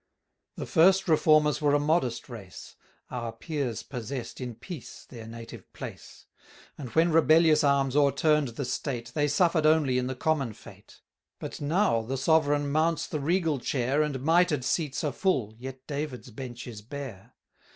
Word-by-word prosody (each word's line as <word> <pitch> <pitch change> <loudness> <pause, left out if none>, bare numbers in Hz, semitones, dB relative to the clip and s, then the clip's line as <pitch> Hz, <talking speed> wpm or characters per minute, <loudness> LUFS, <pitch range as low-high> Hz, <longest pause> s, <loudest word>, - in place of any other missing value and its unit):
The - - -5
first 190 +3 +4
Reformers 155 -1 +4
were 145 -1 +3
a - - +3
modest 145 -5 0
race; 105 -7 -10 0.4
Our 120 -2 -4
peers 125 0 -4
possess'd 125 0 -6
in 125 -2 -5
peace 145 - -9
their 115 -3 -10
native 115 0 -10
place; - - -10 0.5
And 130 -4 -7
when 165 +1 +4
rebellious 160 -1 +5
arms 140 -2 +2
o'erturn'd 145 -2 +2
the 140 - -3
state, 125 -1 -3
730 - - -17
They 150 -2 +1
suffer'd 160 +1 +2
only 150 -5 +3
in 125 - -2
the 130 - -3
common 135 -3 0
fate: 105 -2 -16 0.4
But - - -7
now 160 - +2
the 130 +4 -4
Sovereign 145 0 +2
mounts 160 +2 +1
the 155 - -4
regal 160 -1 +1
chair, 130 +3 0
And 140 -3 -2
mitred 165 -5 +3
seats 150 -3 -1
are 150 - 0
full, 130 - 0
yet 130 +1 -8
David's 140 -4 -5
bench 120 +1 -8
is 110 -4 -8
bare. 130 -4 -9
140 Hz, 160 wpm, -28 LUFS, 125-155 Hz, 0.5 s, rebellious